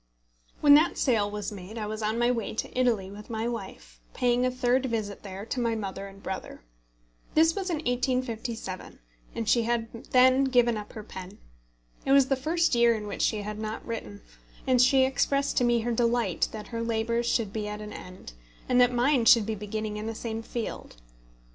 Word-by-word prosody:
When 290 -1 +8
that 310 +4 +5
sale 220 -6 +2
was 210 0 -4
made 200 +2 -9
I 215 - -3
was 215 +1 -5
on 215 +1 -1
my 240 +1 +3
way 230 -3 -3
to - - -4
Italy 230 -7 +1
with 205 +1 -11
my 225 0 -2
wife, 190 - -7 0.2
paying 245 0 +2
a 255 - +3
third 250 +1 +1
visit 215 -4 -3
there 195 0 -7
to 250 - -3
my 230 -2 0
mother 195 -2 -5
and 195 0 -14
brother. 190 -1 -6 0.7
This 325 +1 +5
was 385 -2 -3
in 340 - 0
1857, 245 - -3 0.4
and 225 - -3
she 235 +2 +4
had 230 0 -3
then 260 +1 +5
given 245 -3 +3
up 210 -1 -7
her 215 - -7
pen. 190 -1 -9 0.7
It 270 - +2
was 275 -1 +5
the 270 - +3
first 325 +5 +1
year 235 -1 +4
in 210 -1 -5
which 205 - -5
she 215 -2 +1
had 210 +1 -5
not 215 0 -5
written, 105 - -6 0.4
and 255 -2 +4
she 260 +1 +5
expressed 275 +1 0
to - - +4
me 240 -1 +3
her 240 +2 -2
delight 235 -4 +1
that 215 -1 -8
her 230 -1 -4
labours 230 +1 0
should 220 -4 0
be 215 -1 -3
at 210 0 -5
an 210 0 -8
end, 180 - -10 0.3
and 250 0 +4
that 245 0 +5
mine 245 0 +2
should 230 -2 +7
be 220 - -2
beginning 210 +1 -4
in 215 +1 -5
the 225 - -4
same 225 0 -4
field. 230 0 -6
230 Hz, 205 wpm, -27 LUFS, 210-250 Hz, 0.7 s, When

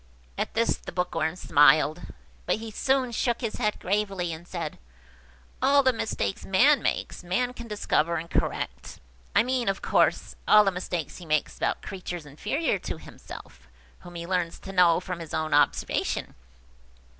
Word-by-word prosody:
At - - -3
this 230 +1 +2
the - - -9
Bookworm 180 -2 -1
smiled; 150 0 +4 0.5
but - - +3
he 220 0 -7
soon 265 +2 +1
shook 235 +1 0
his 230 -3 -3
head 210 -3 -1
gravely, 195 -3 -1
and 165 +2 -10
said–"All 65 - -3
the 260 -1 +4
mistakes 220 -3 -2
man 270 +10 +4
makes, - - -2
man 245 +8 0
can 235 -2 -9
discover 170 -6 0
and 165 +1 -3
correct–I 60 - -2
mean, 250 -2 0
of 195 - -3
course, - - +2
all 210 0 +8
the 195 - +2
mistakes 180 -2 -4
he 180 - -10
makes 155 -1 0
about - - -1
creatures 180 -4 -6
inferior 210 - -1
to - - -5
himself, - - -12 0.3
whom 175 -1 -12
he 170 0 -5
learns 175 -2 -1
to 195 - -7
know 175 -3 +5
from 180 -1 -6
his 165 -2 -6
own 155 -1 -1
observation. 145 -1 +1
180 Hz, 155 wpm, -27 LUFS, 155-220 Hz, 0.5 s, all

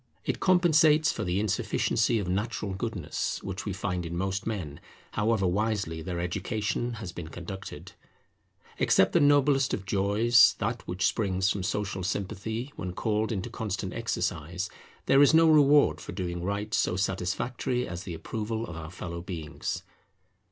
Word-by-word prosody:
It - - -1
compensates 160 -4 +4
for - - -4
the 90 +1 0
insufficiency 110 +2 +1
of 100 -4 -2
natural 105 +1 -2
goodness 95 -5 -3
which 95 +1 -5
we 105 - -2
find 90 -2 -2
in 85 0 -4
most 95 +3 -2
men, 90 -10 -4 0.3
however 105 -2 +1
wisely 95 -3 0
their 85 +1 -4
education 105 +6 -2
has 105 -6 -6
been 85 -2 -7
conducted. 90 +4 -8 0.9
Except - - +4
the - - +5
noblest 145 -2 +4
of 95 - -8
joys, 105 +6 +4
that 115 +2 -3
which 90 +2 -1
springs 95 -3 +1
from 100 - -2
social 95 +1 -2
sympathy 105 +7 -3
when 90 -1 -5
called 110 +3 0
into 105 +2 -3
constant 100 -5 -3
exercise, 90 -4 -2 0.3
there 135 - +5
is 145 +2 +6
no 165 0 +7
reward 150 -2 +5
for - - -7
doing 85 -2 -3
right 100 +3 -3
so 90 - +2
satisfactory 100 +7 -1
as 85 0 -5
the 90 -4 -6
approval 110 +6 -3
of 90 - -8
our 80 -1 -7
fellow 85 -1 -6
beings. 85 -4 -5
100 Hz, 155 wpm, -28 LUFS, 90-115 Hz, 0.9 s, no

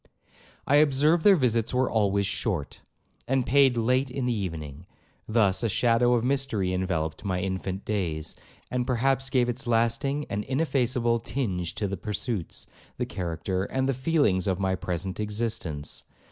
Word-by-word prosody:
'I 145 - +4
observed 150 +3 +4
their 200 -2 +7
visits 120 -6 +1
were 130 +1 +2
always 100 -2 +1
short, 95 -6 -2 0.5
and 130 -1 +1
paid 135 -2 +4
late 125 +3 +2
in 130 0 -3
the 125 - +1
evening; 80 -6 -5 0.4
thus 105 -4 +2
a 115 - 0
shadow 120 +3 +3
of 115 - 0
mystery 125 -8 0
enveloped 85 -4 -2
my 95 -3 -1
infant 95 0 -3
days, 85 -7 -2 0.4
and 125 -1 -1
perhaps 135 +2 +1
gave 125 -3 +2
its 120 +1 -3
lasting 120 +5 +1
and 105 +1 -3
ineffaceable 125 -5 +1
tinge 95 -9 -3
to 105 - -1
the 100 0 -4
pursuits, 105 -1 -4 0.3
the - - -1
character, 90 +2 -3
and 130 +3 -1
the 135 - +2
feelings 130 - +1
of 95 -1 0
my 95 -1 +1
present 90 +2 -3
existence. 105 -9 -3
115 Hz, 155 wpm, -27 LUFS, 95-130 Hz, 0.5 s, their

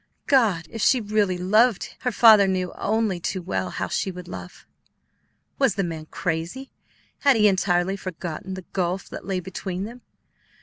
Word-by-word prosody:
God! 215 - +3
If 225 - -5
she 255 - +4
really 205 -4 0
loved, 215 +4 +2
her 250 - -1
father 215 -3 +7
knew 185 -1 -1
only 215 -3 0
too 180 +1 -3
well 185 +1 -2
how - - -3
she - - -1
would 180 -1 -8
love. 90 -1 -9 0.9
Was - - +3
the 200 - 0
man 160 -3 -5
crazy? 175 +14 -4 0.5
Had 280 -2 +4
he 210 -1 +5
entirely 190 -1 +1
forgotten 185 -1 -6
the 185 -2 -9
gulf 185 +1 -1
that - - -8
lay 190 -2 -1
between 185 +1 -5
them? 235 +4 -8
190 Hz, 165 wpm, -24 LUFS, 180-215 Hz, 0.9 s, father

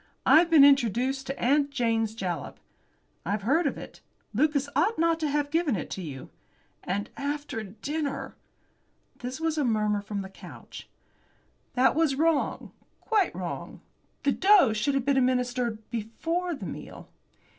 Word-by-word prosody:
I've 335 +2 +6
been 310 -4 +8
introduced 265 0 +2
to 270 - -4
'Aunt 285 +3 +2
Jane's 225 -5 0
Jalap.'" 180 -8 -4 0.6
"I've 200 +3 -2
heard 300 - +2
of - - -3
it. - - -10 0.3
Lucas 285 +3 +1
ought 450 - +2
not 330 0 +2
to 310 -2 -1
have 290 0 -1
given 325 -6 +1
it 170 - -4
you." 150 -8 -8 0.5
"And 205 +4 -3
after 290 -4 -3
dinner!" 275 +9 -4 0.9
This 250 +4 -5
was 320 -1 -1
a - - +2
murmur 210 -4 +1
from 200 -1 -4
the 190 - -9
couch. 195 - -12 0.9
"That 260 +1 +4
was 315 -3 +2
wrong 315 0 0 0.3
quite 430 -4 +1
wrong. - - -6 0.4
The 280 - +3
dose 380 - +5
should 275 +6 0
have 270 -2 0
been 280 -1 +2
administered 250 -3 0
before 330 +11 -2
the - - -8
meal." - - -8
270 Hz, 145 wpm, -27 LUFS, 220-305 Hz, 0.9 s, been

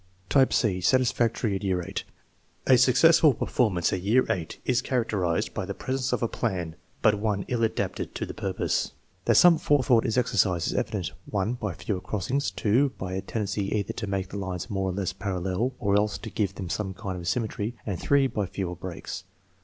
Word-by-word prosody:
Type 135 -2 +4
c 95 -6 +1
(satisfactory 120 -1 +2
at 95 - -4
year 95 -2 +1
VJLL1). - - -4 0.7
A - - +9
successful 150 +3 +6
performance 95 -10 +1
at 95 - -1
year 115 +7 +4
VULl 85 -4 -2 0.2
is 125 -1 +2
characterized 105 -9 0
by - - -3
the 100 +1 -5
presence 130 0 -2
of 125 - 0
a - - +3
plan, 90 -9 -2 0.3
but 105 -2 +4
one 105 -2 -1
ill 120 -2 0
adapted 110 - -2
to - - -2
the - - -7
purpose. - - -1 0.3
That - - +4
some 175 -2 +7
forethought 130 -4 +3
is 115 - 0
exercised 95 -8 +2
is - - -2
evidenced, - - -2 0.2
(1) 105 +3 0
by 105 -6 -3
fewer 95 -4 -3
crossings, 105 +9 -1
(2) 125 +6 +2
by 95 -1 -4
a 95 - -2
tendency 100 -2 -2
either 100 -2 -1
to 110 - -4
make 95 -1 -2
the 100 - -6
lines 95 +2 -4
more 95 -1 0
or - - -2
less 95 -1 -2
parallel 95 +5 -2
or 100 -1 +1
else 105 +1 +2
to 110 - -8
give 100 -3 -1
them 95 - -5
some 95 +1 -3
kind 95 0 -5
of 85 - -7
symmetry, 110 +1 -1
and 100 -5 -3
(3) 140 -1 +3
by 105 -7 -1
fewer 90 -1 -4
breaks. 90 0 -6
105 Hz, 200 wpm, -27 LUFS, 95-125 Hz, 0.7 s, A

